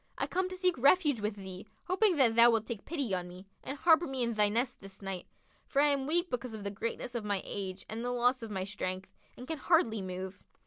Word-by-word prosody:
I - - 0
come 370 +1 -1
to 370 - -5
seek 365 -5 +1
refuge 285 - +4
with 210 0 -1
thee, 190 0 -8 0.2
hoping 370 +1 +2
that 255 -6 +4
thou 235 +1 +8
wilt 225 -2 +2
take 225 -3 -6
pity 280 - -2
on 180 -1 -1
me 180 +2 -11 0.2
and 275 - -5
harbour 330 +2 +5
me 265 -2 -1
in 235 0 0
thy 210 -1 +3
nest 240 +4 -1
this 195 0 -12
night; 195 -2 -5 0.4
for 275 - 0
I 295 +1 +5
am 275 -1 0
weak 345 +3 +1
because 250 -2 -3
of 210 - -7
the 200 - -3
greatness 230 +4 -4
of 235 -3 -3
my 205 -2 0
age 190 -1 -5
and 225 +2 -5
the 245 - -1
loss 245 +1 +2
of 225 - -6
my 190 -3 -2
strength, 190 -1 -4 0.2
and 250 - -9
can 320 -2 -4
hardly 255 - +2
move. 185 0 -6
235 Hz, 250 wpm, -31 LUFS, 200-280 Hz, 0.4 s, thou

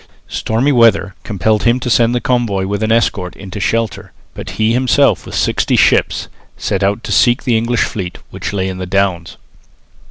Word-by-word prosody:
Stormy 120 +6 0
weather 115 -6 +3
compelled 105 +1 0
him 120 +2 +2
to 125 - -5
send 120 0 +3
the - - +1
convoy 115 -7 0
with 100 +1 -3
an 110 0 0
escort 100 -5 0
into 100 +1 -8
shelter, 115 +2 -2 0.2
but - - -8
he 110 +1 +2
himself 125 0 +2
with - - -7
sixty - - +1
ships - - +2 0.3
set 100 - -2
out 100 +4 0
to - - -6
seek 120 +1 +3
the 120 -4 +1
English 115 +1 +1
fleet, 90 -4 -5
which - - -5
lay 95 -2 -2
in 95 -1 -5
the 95 - -5
Downs. 90 -3 -1
110 Hz, 185 wpm, -15 LUFS, 95-120 Hz, 0.3 s, weather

